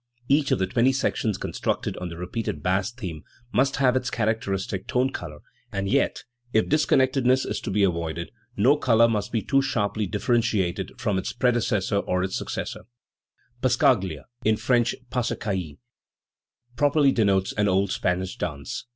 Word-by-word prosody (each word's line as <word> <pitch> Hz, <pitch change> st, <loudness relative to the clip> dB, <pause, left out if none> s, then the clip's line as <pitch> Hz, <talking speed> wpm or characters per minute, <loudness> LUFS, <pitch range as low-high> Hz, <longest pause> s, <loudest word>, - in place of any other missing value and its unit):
Each 140 Hz, 0 st, +3 dB
of -, -, +3 dB
the 95 Hz, -, +1 dB
twenty 120 Hz, +7 st, +2 dB
sections 110 Hz, -6 st, 0 dB
constructed -, -, -2 dB
on 90 Hz, -, -5 dB
the 85 Hz, -, -8 dB
repeated 90 Hz, -3 st, -4 dB
bass 95 Hz, +3 st, +1 dB
theme 90 Hz, -11 st, -7 dB, 0.3 s
must 135 Hz, +2 st, +2 dB
have 130 Hz, -3 st, +3 dB
its 130 Hz, 0 st, 0 dB
characteristic 100 Hz, -4 st, -2 dB
tone 130 Hz, +2 st, +1 dB
colour, 75 Hz, 0 st, -7 dB, 0.3 s
and 100 Hz, 0 st, -2 dB
yet, -, -, +1 dB, 0.3 s
if 110 Hz, -, +3 dB
disconnectedness 130 Hz, -3 st, +3 dB
is -, -, -3 dB
to -, -, -5 dB
be 100 Hz, +1 st, +2 dB
avoided, 85 Hz, -2 st, -1 dB, 0.3 s
no 140 Hz, +4 st, +5 dB
colour 115 Hz, -5 st, +4 dB
must 105 Hz, -2 st, -1 dB
be 115 Hz, -2 st, -1 dB
too 135 Hz, -1 st, +3 dB
sharply 105 Hz, -5 st, -1 dB
differentiated 105 Hz, -3 st, 0 dB
from 100 Hz, -2 st, 0 dB
its -, -, -4 dB
predecessor 120 Hz, -5 st, +1 dB
or 90 Hz, -2 st, 0 dB
its 95 Hz, 0 st, -2 dB
successor, -, -, -4 dB, 0.8 s
Passacaglia, 105 Hz, -, +2 dB, 0.2 s
in 110 Hz, 0 st, +3 dB
French 120 Hz, -1 st, +2 dB, 0.2 s
passecaille 100 Hz, -, -2 dB, 1.0 s
properly 145 Hz, +2 st, +4 dB
denotes 100 Hz, -5 st, +2 dB
an 105 Hz, 0 st, +1 dB
old 95 Hz, 0 st, +2 dB
Spanish 90 Hz, 0 st, -1 dB
dance. 70 Hz, -, -5 dB
105 Hz, 150 wpm, -25 LUFS, 95-125 Hz, 1.0 s, no